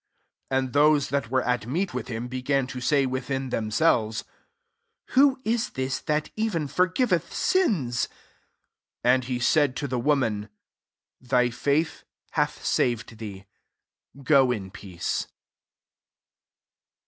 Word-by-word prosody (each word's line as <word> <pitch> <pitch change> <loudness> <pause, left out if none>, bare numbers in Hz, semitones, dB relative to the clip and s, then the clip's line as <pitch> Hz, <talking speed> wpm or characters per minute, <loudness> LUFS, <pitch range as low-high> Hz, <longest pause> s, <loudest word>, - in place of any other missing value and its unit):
49 130 0 +1
And 130 - -8
those 145 0 +4
that 140 -5 -1
were 130 0 +1
at 125 -2 -1
meat 175 +8 -1
with - - -4
him 115 0 -4
began 130 +2 0
to 130 0 -7
say, 140 +2 +3
within 130 0 -3
themselves, 110 -2 +1 0.4
<* - - -53
Who 270 0 +5
is 230 +1 0
this 130 0 -1
that 150 0 -1
even 210 -9 -1
forgiveth 185 - +1
sins? 165 - +1
50 - - -21 0.9
And 130 +1 +4
he 125 -1 -2
said 140 +2 +2
to 140 - -3
the 125 -1 -2
woman, 115 -7 0 0.7
"Thy 125 -1 +2
faith 145 +6 0 0.3
hath - - -1
saved 115 -2 0
thee: 100 -3 -8 0.8
go 135 -1 +5
in 95 -5 -4
peace.'' 90 -4 -4
130 Hz, 130 wpm, -26 LUFS, 120-150 Hz, 0.9 s, Who